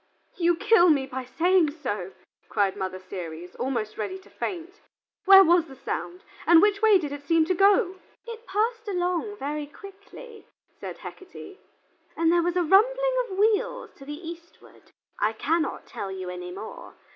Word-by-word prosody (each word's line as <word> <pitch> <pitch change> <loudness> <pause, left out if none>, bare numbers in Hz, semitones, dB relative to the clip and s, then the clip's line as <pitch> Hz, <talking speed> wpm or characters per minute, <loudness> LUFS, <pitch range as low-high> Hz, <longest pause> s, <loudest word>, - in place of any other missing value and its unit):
"You 345 -1 +2
kill 410 -1 +4
me 280 -4 +3
by 260 -1 -6
saying 345 +4 +2
so," 210 - -5 0.4
cried 200 -3 +1
Mother 190 -2 -4
Ceres, 180 -2 -8
almost 235 -5 -3
ready 370 - -3
to 380 - -19
faint; 360 +2 -6 0.4
"where 390 0 +9
was 345 -1 +3
the 270 - -12
sound, 350 +7 -5 0.2
and 340 -1 +8
which 405 +2 +3
way 435 -2 +6
did 300 -6 -4
it 285 0 -6
seem 320 +2 +2
to 370 - +1
go?" 385 -1 +3 0.3
"It 460 -1 -9
passed 445 +3 -1
along 360 +2 -2
very 295 0 -4
quickly," 405 +5 -13 0.3
said - - -7
Hecate, 380 +1 -11 0.6
"and 330 0 +3
there 345 - +4
was 350 +1 -1
a 360 - +2
rumbling - - +3
of 380 - -6
wheels 465 +4 0
to 275 - -13
the 295 +4 -8
eastward. 335 0 -13 0.3
I 210 +2 +1
cannot 315 +8 -1
tell 195 - -6
you 185 -1 -6
any 180 0 -7
more. 460 - -9
345 Hz, 170 wpm, -26 LUFS, 270-400 Hz, 0.6 s, where